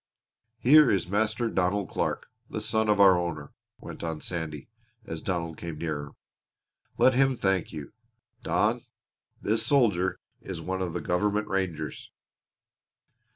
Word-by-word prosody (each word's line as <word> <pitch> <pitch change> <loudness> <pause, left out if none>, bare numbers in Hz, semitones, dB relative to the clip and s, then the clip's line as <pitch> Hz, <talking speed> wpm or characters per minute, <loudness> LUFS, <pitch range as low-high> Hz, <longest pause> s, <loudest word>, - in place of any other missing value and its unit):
Here 145 +3 +7
is 95 - +2
Master 110 +4 0
Donald 95 -1 0
Clark, - - -1 0.2
the - - -4
son 110 -1 0
of 105 -1 +3
our 95 -2 +8
owner," 80 -4 -4 0.3
went - - -9
on 80 -2 -3
Sandy, 80 -5 -4 0.4
as 80 -1 -6
Donald 85 -3 -3
came 85 -3 -6
nearer. 75 -3 -4 0.8
"Let 130 - +5
him 135 +1 +3
thank 95 -4 0
you. 75 -3 -8 0.5
Don, - - +1 0.6
this 110 +2 +1
soldier 100 -9 +2 0.2
is 95 -3 -6
one 95 +3 -3
of 90 -3 -2
the 90 - -3
government 105 +5 0
rangers." 85 -6 -3
95 Hz, 135 wpm, -27 LUFS, 80-105 Hz, 0.8 s, our